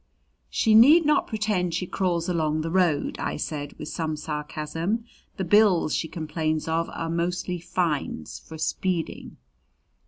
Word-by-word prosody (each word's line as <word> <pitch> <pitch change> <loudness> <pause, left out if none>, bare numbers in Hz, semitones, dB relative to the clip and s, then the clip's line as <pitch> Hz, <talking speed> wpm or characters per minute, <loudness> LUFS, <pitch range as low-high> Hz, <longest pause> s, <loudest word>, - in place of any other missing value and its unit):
"She 220 - +2
need 290 +10 +8
not 300 0 +3
pretend 210 -6 -1
she 180 - -1
crawls 175 -2 -1
along 155 -3 0
the 165 +1 -3
road," 175 -5 +1
I - - -2
said 145 -1 -4
with - - -8
some 160 -2 -2
sarcasm. 155 +7 -3 0.3
"The 190 - -1
bills 190 -4 +4
she 160 - -1
complains 155 -1 -2
of 165 +1 0
are 165 - -4
mostly 175 +2 -2
fines 160 - -2
for 160 - -11
speeding." 170 +1 -2
170 Hz, 145 wpm, -25 LUFS, 155-185 Hz, 0.3 s, need